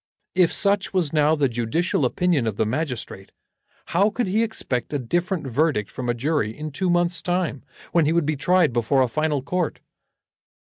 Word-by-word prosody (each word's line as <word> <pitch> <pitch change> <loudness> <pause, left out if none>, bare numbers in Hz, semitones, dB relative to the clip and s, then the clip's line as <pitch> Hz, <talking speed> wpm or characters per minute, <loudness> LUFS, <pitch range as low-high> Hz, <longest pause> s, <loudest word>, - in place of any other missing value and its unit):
If 180 -2 +4
such 200 0 0
was 165 -6 +1
now 155 0 +4
the 145 -3 +2
judicial 125 +7 0
opinion 155 -2 +1
of 110 - -2
the - - +2
magistrate, 125 -6 -4 0.6
how 195 +5 +4
could 240 +3 -1
he 200 +4 +1
expect 140 - -2
a - - +2
different 175 - -1
verdict 135 -4 0
from 125 -1 -4
a 120 - +1
jury 120 -4 -1
in 155 0 -5
two 185 +6 -1
months' 175 0 +1
time, 175 -6 -1 0.3
when 170 -3 +3
he - - +2
would 170 -2 +2
be 155 +1 0
tried 160 +1 +2
before 125 +3 +2
a - - +1
final 150 +1 -1
court? 175 +2 -2
155 Hz, 185 wpm, -23 LUFS, 130-175 Hz, 0.6 s, If